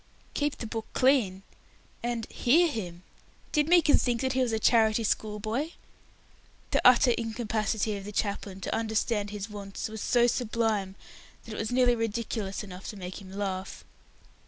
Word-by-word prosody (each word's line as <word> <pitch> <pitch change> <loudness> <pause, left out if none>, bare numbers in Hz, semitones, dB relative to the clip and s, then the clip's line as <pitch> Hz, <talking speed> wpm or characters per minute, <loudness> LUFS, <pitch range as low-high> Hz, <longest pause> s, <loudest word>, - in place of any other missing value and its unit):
"Keep 290 0 -1
the - - -5
book 225 0 -5
clean!" 230 -8 +3 0.6
and 235 -1 -2
"hear 330 +8 +4
him!" 180 - -5 0.5
Did 300 0 +2
Meekin 340 -3 +5
think 240 -2 0
that 260 0 0
he 260 - +1
was 250 -2 +1
a 220 - +1
charity 220 0 +3
school 210 0 -1
boy? 240 +10 -2 1.0
The - - +2
utter 250 0 +7
incapacity 220 -2 -1
of 200 - -6
the 210 - -6
chaplain 200 -2 -3
to - - -3
understand 220 -1 0
his 205 0 -5
wants 205 -1 -6
was 220 -1 -7
so 240 -1 +3
sublime 225 -5 0 0.5
that 225 - -8
it - - -6
was 220 +1 -2
nearly 245 -1 +4
ridiculous 225 -3 -3
enough 185 -2 -9
to 210 - -6
make 185 +1 -7
him 190 -1 -11
laugh. 195 -1 -4
220 Hz, 165 wpm, -28 LUFS, 205-240 Hz, 1.0 s, utter